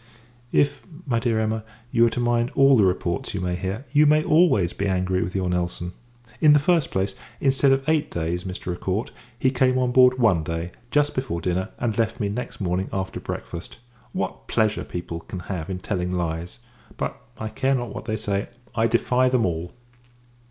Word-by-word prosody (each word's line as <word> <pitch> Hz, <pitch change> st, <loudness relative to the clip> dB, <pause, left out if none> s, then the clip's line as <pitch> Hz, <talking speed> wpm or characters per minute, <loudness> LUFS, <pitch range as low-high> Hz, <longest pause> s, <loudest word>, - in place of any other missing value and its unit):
If, 145 Hz, 0 st, +2 dB, 0.2 s
my 120 Hz, -5 st, +1 dB
dear 115 Hz, -2 st, +1 dB
Emma, 110 Hz, 0 st, -1 dB, 0.3 s
you 115 Hz, 0 st, +5 dB
are -, -, -2 dB
to -, -, +2 dB
mind 120 Hz, 0 st, +2 dB
all 135 Hz, 0 st, +6 dB
the 110 Hz, -, +5 dB
reports 90 Hz, -1 st, 0 dB
you -, -, -1 dB
may 90 Hz, -1 st, -1 dB
hear, 95 Hz, +8 st, -4 dB
you 150 Hz, +1 st, +5 dB
may 155 Hz, +1 st, +4 dB
always 145 Hz, -, +4 dB
be 100 Hz, -, -2 dB
angry 90 Hz, -1 st, +1 dB
with 90 Hz, -, -3 dB
your 95 Hz, -1 st, 0 dB
Nelson. 90 Hz, 0 st, -2 dB, 0.5 s
In 150 Hz, -1 st, +7 dB
the 150 Hz, -, +6 dB
first 165 Hz, 0 st, +2 dB
place, 95 Hz, +1 st, -1 dB, 0.3 s
instead 135 Hz, 0 st, +3 dB
of 135 Hz, +1 st, +1 dB
eight 155 Hz, -1 st, +2 dB
days, 85 Hz, +1 st, -2 dB
Mr. 90 Hz, -1 st, -4 dB
Acourt; 95 Hz, +4 st, -2 dB, 0.3 s
he 130 Hz, +1 st, +2 dB
came 130 Hz, 0 st, +2 dB
on 125 Hz, -1 st, +1 dB
board 125 Hz, 0 st, +6 dB
one 110 Hz, -10 st, +4 dB
day, 85 Hz, +2 st, -4 dB, 0.2 s
just 145 Hz, +2 st, +2 dB
before 130 Hz, -10 st, -2 dB
dinner, 90 Hz, +3 st, -1 dB
and 115 Hz, -2 st, -1 dB
left 115 Hz, +2 st, 0 dB
me 105 Hz, -3 st, 0 dB
next 120 Hz, +5 st, -5 dB
morning, 95 Hz, -1 st, -1 dB
after 95 Hz, -1 st, -3 dB
breakfast. 85 Hz, +1 st, -6 dB, 0.3 s
What -, -, -4 dB
pleasure 110 Hz, -1 st, +1 dB
people 85 Hz, -1 st, -5 dB
can 90 Hz, +2 st, -7 dB
have 85 Hz, -1 st, -5 dB
in 95 Hz, -, -2 dB
telling 90 Hz, -1 st, -2 dB
lies! 85 Hz, -1 st, -3 dB, 0.4 s
But, -, -, -3 dB, 0.2 s
I 110 Hz, 0 st, -4 dB
care 135 Hz, +5 st, +1 dB
not 120 Hz, -4 st, -3 dB
what -, -, -7 dB
they 110 Hz, -, -1 dB
say; 100 Hz, -2 st, -2 dB, 0.2 s
I 115 Hz, 0 st, +2 dB
defy 125 Hz, +2 st, +2 dB
them 125 Hz, -2 st, +2 dB
all. 85 Hz, 0 st, -2 dB
110 Hz, 195 wpm, -24 LUFS, 90-130 Hz, 0.5 s, In